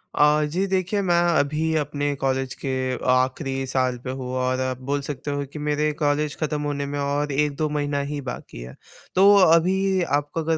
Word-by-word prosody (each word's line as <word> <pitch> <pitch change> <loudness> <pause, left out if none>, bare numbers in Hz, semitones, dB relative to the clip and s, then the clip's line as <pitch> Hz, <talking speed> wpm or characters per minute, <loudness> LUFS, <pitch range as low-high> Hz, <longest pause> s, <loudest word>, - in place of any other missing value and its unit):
अ, 150 +1 +4
जी 180 +6 -1
देखिए 190 +2 0
मैं 175 -3 +2 0.2
अभी 155 +3 0
अपने 145 -1 -1
कॉलेज 130 -1 0
के 135 - -1 0.4
आख़िरी 135 +1 0
साल 130 -1 0
पे 130 - -4
हूँ 130 -1 -5
और 130 0 0
आप 130 0 -3
बोल 145 0 0
सकते 145 0 -5
हो 145 0 -2
कि 150 - -6
मेरे 150 +1 0
कॉलेज 145 0 +1
ख़त्म 150 -1 -1
होने 145 -1 -2
में 145 +1 -4
और 145 +1 -1
1-2 150 +2 0
महीना 145 -1 -1
ही 150 - -3
बाकी 125 - -7
है। 60 +1 -9 0.4
तो 195 +2 +7
अभी 185 +2 +4 0.2
आपको 145 +2 -4
अगर 160 0 0
145 Hz, 185 wpm, -23 LUFS, 135-155 Hz, 0.4 s, तो